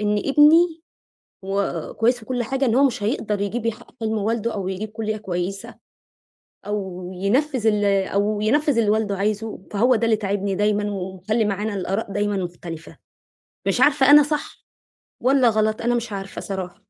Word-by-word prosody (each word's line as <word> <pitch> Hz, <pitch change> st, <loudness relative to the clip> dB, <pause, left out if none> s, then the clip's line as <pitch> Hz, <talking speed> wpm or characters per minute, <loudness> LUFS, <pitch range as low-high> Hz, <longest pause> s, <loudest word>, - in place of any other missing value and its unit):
إن 210 Hz, 0 st, +1 dB
ابني، 315 Hz, +5 st, +4 dB, 0.6 s
هو 195 Hz, -4 st, -2 dB
كويس 240 Hz, +1 st, +2 dB
وكل 245 Hz, +2 st, -2 dB
حاجة، 270 Hz, +3 st, -1 dB
إن 230 Hz, -, +2 dB
هو 275 Hz, +3 st, +5 dB
مش 245 Hz, -6 st, 0 dB
هيقدر 210 Hz, -2 st, -1 dB
يجيّب 220 Hz, +3 st, -2 dB
يحقِّق 230 Hz, +2 st, -5 dB
حِلم 220 Hz, -1 st, -1 dB
والده 225 Hz, +2 st, -1 dB
أو 190 Hz, -2 st, -3 dB
يجيّب 195 Hz, +3 st, -4 dB
كُلية 215 Hz, 0 st, -3 dB
كويسة، 195 Hz, -1 st, -4 dB, 0.9 s
أو 190 Hz, -3 st, -4 dB
ينفِّذ 240 Hz, +6 st, 0 dB
ال 210 Hz, -1 st, +2 dB, 0.2 s
أو 205 Hz, +1 st, 0 dB
ينفِّذ 285 Hz, +4 st, +2 dB
اللي 215 Hz, -2 st, +3 dB
والده 215 Hz, -2 st, 0 dB
عايزه. 210 Hz, +2 st, -2 dB
فهو 240 Hz, +5 st, +3 dB
ده 230 Hz, 0 st, 0 dB
اللي 225 Hz, -1 st, +3 dB
تاعبني 200 Hz, -1 st, -2 dB
دايمًا 205 Hz, +1 st, +1 dB
ومخلِّي 190 Hz, +3 st, -2 dB
معانا 205 Hz, +1 st, -2 dB
الآراء 195 Hz, +2 st, -3 dB
دايمًا 205 Hz, 0 st, 0 dB
مختلفة، 175 Hz, -3 st, -7 dB, 0.7 s
مش -, -, +1 dB
عارفة، 280 Hz, -2 st, +5 dB
أنا 295 Hz, 0 st, +9 dB
صح 295 Hz, +1 st, -4 dB, 0.6 s
والّا 260 Hz, -1 st, +4 dB
غلط. 215 Hz, 0 st, 0 dB
أنا 240 Hz, +1 st, +1 dB
مش 235 Hz, -1 st, -3 dB
عارفة 195 Hz, 0 st, -6 dB
صراحة. 190 Hz, -3 st, -5 dB
215 Hz, 165 wpm, -22 LUFS, 200-235 Hz, 0.9 s, أنا